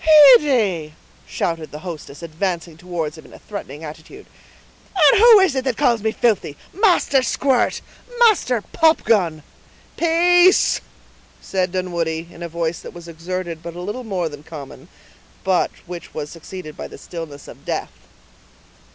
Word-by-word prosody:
"Heyday!" 205 Hz, -, +1 dB, 0.3 s
shouted 165 Hz, -3 st, -3 dB
the 150 Hz, -, -8 dB
hostess, 155 Hz, -3 st, -8 dB
advancing 170 Hz, 0 st, -3 dB
towards 165 Hz, -2 st, -5 dB
him -, -, -14 dB
in -, -, -17 dB
a -, -, -11 dB
threatening 160 Hz, -8 st, -8 dB
attitude; 160 Hz, -, -10 dB, 0.7 s
"and 305 Hz, 0 st, +6 dB
who 465 Hz, -3 st, +9 dB
is 375 Hz, -7 st, +3 dB
it 265 Hz, -1 st, -1 dB
that 255 Hz, -4 st, -1 dB
calls 235 Hz, -3 st, +2 dB
me 220 Hz, +1 st, 0 dB
filthy? 215 Hz, -11 st, 0 dB, 0.2 s
Master 355 Hz, -9 st, +3 dB
Squirt! 260 Hz, -1 st, +1 dB, 0.4 s
Master 360 Hz, -, +3 dB
Popgun—" 210 Hz, -, +2 dB, 0.5 s
"Peace!" 350 Hz, +2 st, +4 dB, 0.6 s
said 185 Hz, -2 st, -2 dB
Dunwoodie, 170 Hz, -3 st, -3 dB
in 170 Hz, -, -14 dB
a 170 Hz, -, -5 dB
voice 165 Hz, 0 st, -2 dB
that -, -, -11 dB
was 170 Hz, -1 st, -10 dB
exerted 170 Hz, 0 st, -5 dB
but 170 Hz, 0 st, -8 dB
a 175 Hz, -, -7 dB
little 210 Hz, +7 st, -5 dB
more 190 Hz, -7 st, -2 dB
than 145 Hz, -2 st, -9 dB
common, 150 Hz, -3 st, -10 dB, 0.6 s
but 185 Hz, -2 st, +2 dB, 0.2 s
which 175 Hz, -1 st, -9 dB
was 150 Hz, -1 st, -5 dB
succeeded 165 Hz, -1 st, -9 dB
by -, -, -7 dB
the -, -, -12 dB
stillness 160 Hz, -5 st, -9 dB
of -, -, -13 dB
death. -, -, -3 dB
180 Hz, 150 wpm, -20 LUFS, 160-250 Hz, 0.7 s, who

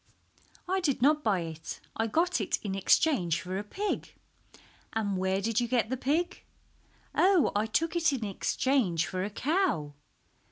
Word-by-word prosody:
"I 380 Hz, +1 st, +1 dB
did 285 Hz, -9 st, 0 dB
not 300 Hz, +2 st, +4 dB
buy 195 Hz, -5 st, +2 dB
it, 160 Hz, -1 st, -7 dB, 0.2 s
I 225 Hz, -, 0 dB
got 335 Hz, +3 st, +1 dB
it 200 Hz, -, 0 dB
in 200 Hz, -3 st, -3 dB
exchange 190 Hz, -, +2 dB
for 185 Hz, +1 st, -4 dB
a -, -, -4 dB
pig." 400 Hz, -, -4 dB, 0.8 s
"And 205 Hz, -3 st, -1 dB
where 190 Hz, +1 st, 0 dB
did 225 Hz, +2 st, +1 dB
you 240 Hz, -, 0 dB
get 235 Hz, -1 st, 0 dB
the -, -, +1 dB
pig?" 325 Hz, +8 st, -1 dB, 0.7 s
"Oh, 370 Hz, -4 st, +4 dB
I 210 Hz, +2 st, +1 dB
took 330 Hz, +10 st, 0 dB
it 335 Hz, -2 st, +3 dB
in 260 Hz, -5 st, -2 dB
exchange 200 Hz, -, +1 dB
for 185 Hz, -1 st, -3 dB
a 200 Hz, -, -2 dB
cow." 265 Hz, -, 0 dB
225 Hz, 165 wpm, -29 LUFS, 190-315 Hz, 0.8 s, not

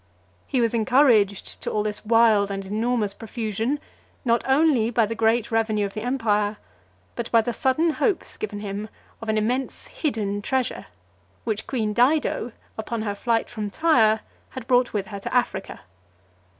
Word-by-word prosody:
He 255 Hz, -, +1 dB
was 230 Hz, -1 st, +1 dB
encouraged 225 Hz, -4 st, +3 dB
to -, -, -2 dB
all 210 Hz, -, 0 dB
this 210 Hz, -1 st, -3 dB
wild 220 Hz, -2 st, +4 dB
and 195 Hz, 0 st, -4 dB
enormous 215 Hz, +1 st, 0 dB
profusion, 225 Hz, +5 st, -3 dB, 0.5 s
not 235 Hz, -1 st, +2 dB
only 265 Hz, -5 st, +3 dB
by 230 Hz, -1 st, +2 dB
the 220 Hz, -, -3 dB
great 225 Hz, +1 st, +1 dB
revenue 220 Hz, -2 st, +1 dB
of 195 Hz, -, -6 dB
the 215 Hz, -, -4 dB
empire, 215 Hz, -4 st, 0 dB, 0.6 s
but 235 Hz, -, -4 dB
by 230 Hz, -, +5 dB
the 240 Hz, +2 st, -3 dB
sudden 280 Hz, +8 st, +2 dB
hopes 395 Hz, +3 st, -1 dB
given 205 Hz, -1 st, -5 dB
him 205 Hz, +1 st, -5 dB, 0.3 s
of 225 Hz, -, -5 dB
an 215 Hz, -, +1 dB
immense 245 Hz, +5 st, -1 dB
hidden 210 Hz, -9 st, -2 dB
treasure, 260 Hz, +3 st, -2 dB, 0.6 s
which 215 Hz, -2 st, -3 dB
queen 220 Hz, -5 st, -1 dB
Dido, 250 Hz, 0 st, +2 dB, 0.3 s
upon 220 Hz, 0 st, -3 dB
her 205 Hz, -2 st, -2 dB
flight 230 Hz, +2 st, 0 dB
from 215 Hz, -3 st, -5 dB
Tyre, 220 Hz, -5 st, +3 dB, 0.3 s
had 260 Hz, -3 st, -8 dB
brought 250 Hz, -1 st, +3 dB
with 205 Hz, -2 st, -2 dB
her 200 Hz, -1 st, -7 dB
to -, -, -6 dB
Africa. 245 Hz, -5 st, -1 dB
225 Hz, 165 wpm, -24 LUFS, 210-245 Hz, 0.6 s, by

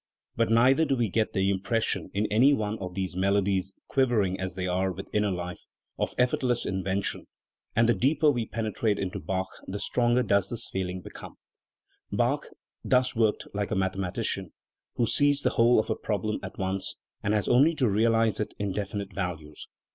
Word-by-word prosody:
But 115 Hz, -, +1 dB
neither 125 Hz, +6 st, +5 dB
do 140 Hz, -, +1 dB
we 120 Hz, -4 st, 0 dB
get 110 Hz, +3 st, 0 dB
the 95 Hz, -1 st, +2 dB
impression 110 Hz, +4 st, -1 dB
in 105 Hz, +2 st, 0 dB
any 125 Hz, +7 st, +5 dB
one 110 Hz, -3 st, -2 dB
of 90 Hz, -2 st, -6 dB
these 95 Hz, -2 st, -3 dB
melodies, 95 Hz, 0 st, +1 dB, 0.2 s
quivering 115 Hz, -9 st, +1 dB
as 95 Hz, -2 st, -4 dB
they 90 Hz, -1 st, -3 dB
are 95 Hz, +1 st, 0 dB
with 95 Hz, +2 st, -7 dB
inner 105 Hz, -1 st, +2 dB
life, 90 Hz, -1 st, -4 dB, 0.4 s
of -, -, -1 dB
effortless 125 Hz, -1 st, +1 dB
invention; 95 Hz, +1 st, -2 dB, 0.5 s
and 115 Hz, +1 st, +4 dB
the 120 Hz, -, +5 dB
deeper 150 Hz, +4 st, +3 dB
we 120 Hz, -5 st, -2 dB
penetrate 110 Hz, -1 st, -1 dB
into 100 Hz, +1 st, -3 dB
Bach, 95 Hz, 0 st, -2 dB, 0.2 s
the 100 Hz, -, -4 dB
stronger 120 Hz, +4 st, +1 dB
does 100 Hz, -3 st, +2 dB
this 120 Hz, -, -2 dB
feeling 95 Hz, -1 st, -3 dB
become*. -, -, -10 dB, 0.8 s
Bach -, -, 0 dB, 0.4 s
thus 130 Hz, 0 st, +2 dB
worked 110 Hz, -2 st, +1 dB
like 100 Hz, 0 st, -2 dB
the -, -, -1 dB
mathematician, 95 Hz, -1 st, -2 dB, 0.4 s
who 120 Hz, -, +2 dB
sees 145 Hz, +4 st, +3 dB
the -, -, +2 dB
whole 120 Hz, +1 st, +4 dB
of -, -, -1 dB
a -, -, +1 dB
problem 105 Hz, 0 st, -2 dB
at 95 Hz, -, -8 dB
once, 95 Hz, 0 st, -2 dB, 0.3 s
and 105 Hz, -, +1 dB
has 105 Hz, -3 st, 0 dB
only 145 Hz, +7 st, +5 dB
to 130 Hz, -5 st, +2 dB
realise 115 Hz, +1 st, +2 dB
it 105 Hz, -, -3 dB
in 100 Hz, -1 st, -2 dB
definite 100 Hz, 0 st, -4 dB
values. 80 Hz, -6 st, -5 dB
105 Hz, 180 wpm, -27 LUFS, 95-115 Hz, 0.8 s, neither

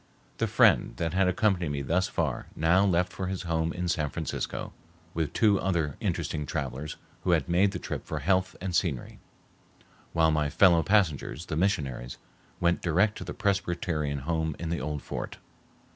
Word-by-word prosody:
The -, -, +1 dB
friend -, -, +4 dB
that 80 Hz, +2 st, -1 dB
had 95 Hz, 0 st, +3 dB
accompanied 90 Hz, -3 st, +1 dB
me 70 Hz, -1 st, -2 dB
thus 90 Hz, +7 st, +1 dB
far -, -, -2 dB
now 85 Hz, +5 st, +4 dB
left 90 Hz, -2 st, +2 dB
for 95 Hz, -, -3 dB
his 95 Hz, 0 st, -3 dB
home 80 Hz, -1 st, 0 dB
in 90 Hz, +1 st, -3 dB
San 75 Hz, -3 st, 0 dB
Francisco, -, -, -4 dB, 0.4 s
with 80 Hz, -4 st, -1 dB
two 105 Hz, -3 st, +3 dB
other 85 Hz, -7 st, 0 dB
interesting 75 Hz, -2 st, -2 dB
travelers 70 Hz, +3 st, -4 dB, 0.3 s
who 90 Hz, -, +2 dB
had 80 Hz, -5 st, +1 dB
made 90 Hz, +4 st, +3 dB
the -, -, -4 dB
trip -, -, -5 dB
for 80 Hz, -, -3 dB
health 95 Hz, +5 st, +1 dB
and 95 Hz, -3 st, -3 dB
scenery, 75 Hz, -11 st, -1 dB, 0.9 s
while 80 Hz, -1 st, +3 dB
my 75 Hz, -1 st, +1 dB
fellow 85 Hz, +2 st, +5 dB
passengers, 85 Hz, -4 st, +1 dB
the 80 Hz, -, -4 dB
missionaries, 70 Hz, -9 st, -1 dB, 0.4 s
went 85 Hz, 0 st, +2 dB
direct 95 Hz, +5 st, +2 dB
to -, -, -5 dB
the -, -, -6 dB
Presbyterian 85 Hz, -7 st, -1 dB
home 80 Hz, +1 st, -1 dB
in 85 Hz, -, -4 dB
the 85 Hz, -, -2 dB
old 75 Hz, -1 st, -3 dB
fort. -, -, -5 dB
85 Hz, 175 wpm, -28 LUFS, 75-95 Hz, 0.9 s, fellow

